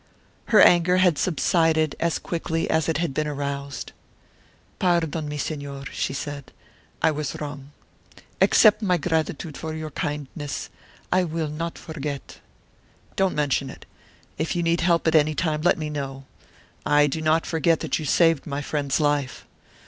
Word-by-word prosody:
Her 215 Hz, -, +5 dB
anger 175 Hz, +1 st, +6 dB
had 180 Hz, -4 st, +3 dB
subsided 160 Hz, -3 st, +2 dB
as 170 Hz, -1 st, +1 dB
quickly 165 Hz, -1 st, -2 dB
as 160 Hz, 0 st, +1 dB
it 160 Hz, -, +1 dB
had 165 Hz, -3 st, -1 dB
been 155 Hz, +2 st, -1 dB
aroused. 140 Hz, -2 st, -4 dB, 0.9 s
"Pardon 165 Hz, -4 st, +1 dB
me, 150 Hz, -, -4 dB
Señor," 140 Hz, -2 st, -5 dB
she -, -, -2 dB
said; 140 Hz, 0 st, -6 dB, 0.5 s
"I 160 Hz, -, +5 dB
was 150 Hz, -1 st, -4 dB
wrong. 145 Hz, -2 st, -7 dB, 0.7 s
Accept 215 Hz, -1 st, +6 dB
my 180 Hz, -4 st, +2 dB
gratitude 160 Hz, -2 st, -2 dB
for 160 Hz, 0 st, -5 dB
your 155 Hz, -1 st, -5 dB
kindness; 145 Hz, 0 st, -4 dB, 0.4 s
I 185 Hz, -, +3 dB
will 160 Hz, -2 st, -2 dB
not 165 Hz, +3 st, -4 dB
forget." 150 Hz, -3 st, -6 dB, 0.8 s
"Don't 190 Hz, -1 st, +1 dB
mention 140 Hz, -2 st, 0 dB
it. -, -, -11 dB, 0.5 s
If 160 Hz, +2 st, -1 dB
you 175 Hz, -, 0 dB
need 170 Hz, +1 st, +1 dB
help 170 Hz, -1 st, +2 dB
at 160 Hz, -, +3 dB
any 155 Hz, -1 st, +4 dB
time, 155 Hz, -2 st, 0 dB
let 175 Hz, -, +3 dB
me 155 Hz, -2 st, -4 dB
know; 135 Hz, -2 st, -5 dB, 0.6 s
I 145 Hz, 0 st, +4 dB
do 145 Hz, +2 st, -2 dB
not 155 Hz, +1 st, +2 dB
forget 165 Hz, 0 st, +1 dB
that -, -, -1 dB
you 155 Hz, -, -5 dB
saved 165 Hz, 0 st, +3 dB
my 145 Hz, 0 st, -3 dB
friend's 145 Hz, -1 st, -1 dB
life. 145 Hz, -3 st, 0 dB
155 Hz, 155 wpm, -24 LUFS, 145-165 Hz, 0.9 s, anger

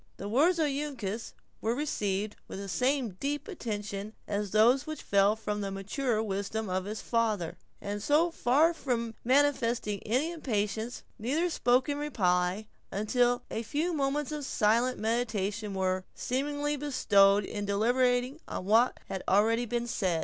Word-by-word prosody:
The 200 Hz, -, -5 dB
words 305 Hz, -, +3 dB
of 320 Hz, -, +2 dB
Uncas 270 Hz, -7 st, -3 dB, 0.3 s
were 225 Hz, +2 st, 0 dB
received 210 Hz, -8 st, -1 dB
with -, -, -7 dB
the 200 Hz, 0 st, -6 dB
same 250 Hz, -, +1 dB
deep 290 Hz, +5 st, -2 dB
attention 210 Hz, -, -5 dB
as 205 Hz, 0 st, -2 dB
those 235 Hz, +7 st, +4 dB
which 310 Hz, 0 st, -5 dB
fell 200 Hz, +1 st, +3 dB
from 210 Hz, -1 st, -3 dB
the 200 Hz, -, -2 dB
maturer 215 Hz, +4 st, -1 dB
wisdom 205 Hz, 0 st, -3 dB
of 185 Hz, 0 st, -1 dB
his 215 Hz, +2 st, -5 dB
father; 215 Hz, -8 st, 0 dB, 0.2 s
and 205 Hz, 0 st, -4 dB
so 305 Hz, +9 st, +3 dB
far 310 Hz, +4 st, +3 dB
from 235 Hz, -7 st, -2 dB
manifesting 240 Hz, -6 st, +2 dB
any 260 Hz, +9 st, 0 dB
impatience, 220 Hz, -6 st, -2 dB, 0.2 s
neither 305 Hz, +11 st, 0 dB
spoke 250 Hz, -3 st, +2 dB
in 290 Hz, 0 st, -1 dB
reply, 185 Hz, -7 st, +1 dB, 0.3 s
until 245 Hz, +4 st, +1 dB
a 225 Hz, -, -2 dB
few 300 Hz, +9 st, -1 dB
moments 290 Hz, 0 st, -1 dB
of 300 Hz, -1 st, -4 dB
silent 235 Hz, 0 st, +2 dB
meditation 215 Hz, -3 st, -1 dB
were, 185 Hz, -1 st, 0 dB
seemingly, 290 Hz, +3 st, -1 dB
bestowed 205 Hz, -8 st, +4 dB
in 205 Hz, -1 st, -4 dB
deliberating 245 Hz, +6 st, +1 dB
on -, -, -5 dB
what 225 Hz, +5 st, +3 dB
had 190 Hz, -, -4 dB
already 225 Hz, +5 st, +3 dB
been 240 Hz, +1 st, -1 dB
said. 185 Hz, -8 st, 0 dB
230 Hz, 150 wpm, -30 LUFS, 205-275 Hz, 0.3 s, those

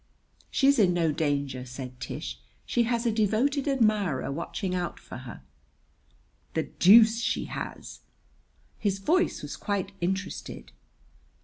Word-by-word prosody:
"She's 275 Hz, -1 st, +3 dB
in 180 Hz, -4 st, +4 dB
no 165 Hz, -2 st, +2 dB
danger," 140 Hz, -4 st, -1 dB
said 125 Hz, 0 st, -8 dB
Tish. -, -, -6 dB, 0.3 s
"She 240 Hz, -1 st, +1 dB
has 235 Hz, 0 st, 0 dB
a 235 Hz, -, +3 dB
devoted 230 Hz, +7 st, +1 dB
admirer 215 Hz, -, +1 dB
watching 180 Hz, +5 st, -3 dB
out 180 Hz, -1 st, -3 dB
for -, -, -10 dB
her." 65 Hz, -, -10 dB, 1.1 s
"The -, -, +1 dB
deuce 225 Hz, +4 st, +6 dB
she -, -, -1 dB
has!" -, -, -7 dB, 0.8 s
His 200 Hz, -2 st, 0 dB
voice 345 Hz, -, +1 dB
was -, -, -5 dB
quite 200 Hz, -2 st, -2 dB
interested. 190 Hz, +2 st, -4 dB
195 Hz, 125 wpm, -27 LUFS, 160-230 Hz, 1.1 s, deuce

